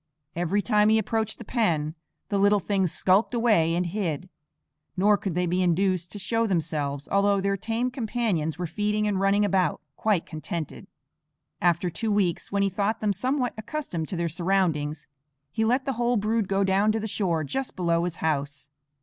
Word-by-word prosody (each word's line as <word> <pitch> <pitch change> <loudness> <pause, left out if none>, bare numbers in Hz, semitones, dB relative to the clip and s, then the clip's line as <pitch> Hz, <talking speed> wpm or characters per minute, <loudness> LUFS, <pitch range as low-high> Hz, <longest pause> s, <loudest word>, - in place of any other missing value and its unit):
Every 175 +4 0
time 210 +4 +3
he 220 - +5
approached 220 0 -1
the 230 - -10
pen 165 - 0 0.4
the 200 - 0
little 205 +1 +4
things 190 -3 0
skulked 195 +6 +2
away 210 -9 +3
and 180 +1 0
hid; 180 -2 -3 0.7
nor 205 +3 +5
could 195 -4 -4
they 180 0 +1
be 180 +2 0
induced 180 0 +1
to - - -7
show 225 +4 0
themselves, 150 -6 -1
although 200 0 +3
their 200 +1 0
tame 230 +5 -2
companions 220 - -1
were 180 - -2
feeding 210 +5 -1
and 200 -2 0
running 200 +1 +3
about, 185 -5 +1 0.2
quite 210 -6 +1
contented. 155 0 -6 0.7
After 175 +1 +2
two 215 +7 -2
weeks, 190 -5 0
when 200 0 +1
he - - +3
thought 200 +3 -1
them 210 -2 +1
somewhat 255 +5 0
accustomed 220 - -4
to - - -4
their 170 0 -1
surroundings, 165 -4 0 0.5
he 220 - 0
let 250 +5 +1
the 270 - -1
whole 240 +1 +1
brood 215 0 0
go 195 0 +1
down 195 +2 +3
to 220 - 0
the 220 - -3
shore 175 -6 0
just 265 - -3
below 170 -2 +1
his 175 -1 -2
house. 145 -2 -2
195 Hz, 185 wpm, -26 LUFS, 170-215 Hz, 0.7 s, he